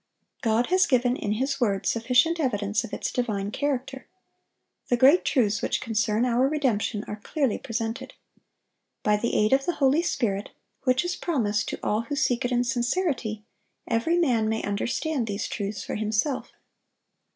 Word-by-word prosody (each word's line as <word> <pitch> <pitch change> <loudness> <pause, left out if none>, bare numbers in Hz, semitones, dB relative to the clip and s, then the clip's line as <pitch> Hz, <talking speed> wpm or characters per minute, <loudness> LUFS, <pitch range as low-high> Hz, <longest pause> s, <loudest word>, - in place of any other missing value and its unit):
God 230 +5 +1
has 370 0 +4
given 245 -1 +2
in 210 -4 -2
His 270 +4 -2
word 200 -5 +1
sufficient 250 +9 +2
evidence 210 -6 0
of 230 - -8
its - - -3
divine 210 -5 -2
character. 270 0 -3 0.8
The 245 - +2
great 275 +9 +6
truths 215 -6 +1
which - - 0
concern 220 +1 0
our 250 +2 +2
redemption 245 -8 0
are 210 - -5
clearly 275 -3 -1
presented. 230 +1 -4 0.9
By 210 -4 +3
the 235 +3 -1
aid 215 +3 +3
of 270 0 +2
the 350 - 0
Holy 280 +3 +3
Spirit, 210 - -1 0.4
which 255 +6 +2
is 355 +1 -1
promised 220 - -1
to - - -5
all 210 +2 +1
who 230 +5 -4
seek 250 -3 +1
it 245 - -1
in 245 0 +2
sincerity, 240 - -1 0.4
every 235 +10 +1
man 240 -10 +2
may 220 0 -1
understand 240 +6 -1
these 205 0 -3
truths 200 -1 -4
for - - -5
himself. 215 +6 -1
240 Hz, 165 wpm, -26 LUFS, 215-270 Hz, 0.9 s, great